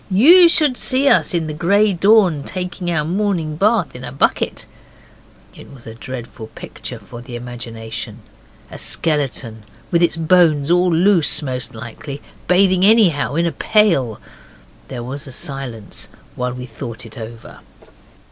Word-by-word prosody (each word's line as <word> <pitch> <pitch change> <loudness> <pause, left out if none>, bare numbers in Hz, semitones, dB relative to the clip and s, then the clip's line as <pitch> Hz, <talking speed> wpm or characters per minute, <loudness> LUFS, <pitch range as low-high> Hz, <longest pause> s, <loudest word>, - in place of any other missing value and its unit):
You 335 - +7
should 300 -6 +3
see 265 +2 +1
us 205 - +3
in 165 -2 0
the 155 - -5
grey 200 +6 +2
dawn 190 -4 +3
taking 180 0 -3
our 155 -3 0
morning 175 -3 -1
bath 205 - +1
in 125 - -8
a 125 - -6
bucket.' 135 - 0 0.9
It - - -14
was 135 -4 -15
a 110 - -8
dreadful 120 -2 -8
picture - - -8
for 120 -1 -11
the 120 0 -9
imagination. 115 -2 -7 0.5
A - - -8
skeleton, 135 -8 -1 0.3
with 170 - +2
its 170 -1 +2
bones 165 -3 +3
all 180 0 +3
loose 170 -3 +3
most 125 -4 -4
likely, 120 +5 -8 0.3
bathing 185 0 +3
anyhow 195 -10 +3
in 170 +1 +1
a 170 - 0
pail. 170 - +1 0.7
There 125 -3 -6
was 140 +4 -7
a - - -9
silence 125 -6 -5 0.3
while 125 0 -3
we 125 0 -7
thought 115 -1 -8
it 115 +1 -9
over. 115 +1 -10
155 Hz, 150 wpm, -18 LUFS, 125-185 Hz, 0.9 s, You